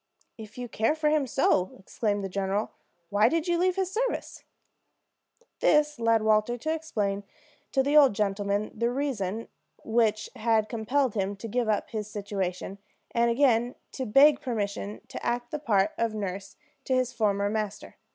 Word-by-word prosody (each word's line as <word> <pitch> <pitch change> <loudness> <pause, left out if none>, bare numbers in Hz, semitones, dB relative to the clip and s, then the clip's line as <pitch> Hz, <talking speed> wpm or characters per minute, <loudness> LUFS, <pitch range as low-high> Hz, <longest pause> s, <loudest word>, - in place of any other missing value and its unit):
"If 220 -1 -11
you 245 0 -5
care 225 +5 +1
for 310 -1 +1
him 300 -3 +2
so," 185 -5 +1
exclaimed 205 +1 -2
the - - -2
general, 195 +2 -2 0.4
"why 205 +1 +4
did 330 0 -1
you 345 -1 +1
leave 365 0 +2
his 380 -1 -1
service?" - - -3 1.2
This 300 -2 +3
led 230 -1 +3
Walter 215 +2 +2
to 315 +7 -2
explain 210 -11 -2 0.5
to 270 - +2
the 285 +2 +1
old 275 -8 +7
gentleman 200 0 -1
the 235 +2 0
reasons 230 -6 -2 0.4
which 220 -2 +1
had 220 -1 +1
compelled 250 +2 0
him 200 -1 -1
to 215 +3 -7
give 235 +1 -1
up 210 - 0
his 215 -2 -4
situation, 195 -2 -4 0.3
and 235 0 +2
again 240 -1 +2 0.2
to 260 -2 -4
beg 275 +6 +6
permission 205 -4 -3
to - - -7
act 240 0 -2
the 300 - -3
part 210 -7 +2
of 230 -1 0
nurse 195 -1 -5 0.3
to 260 - +1
his 255 -1 0
former 200 -2 +1
master. 210 -1 -4
225 Hz, 165 wpm, -27 LUFS, 205-260 Hz, 1.2 s, old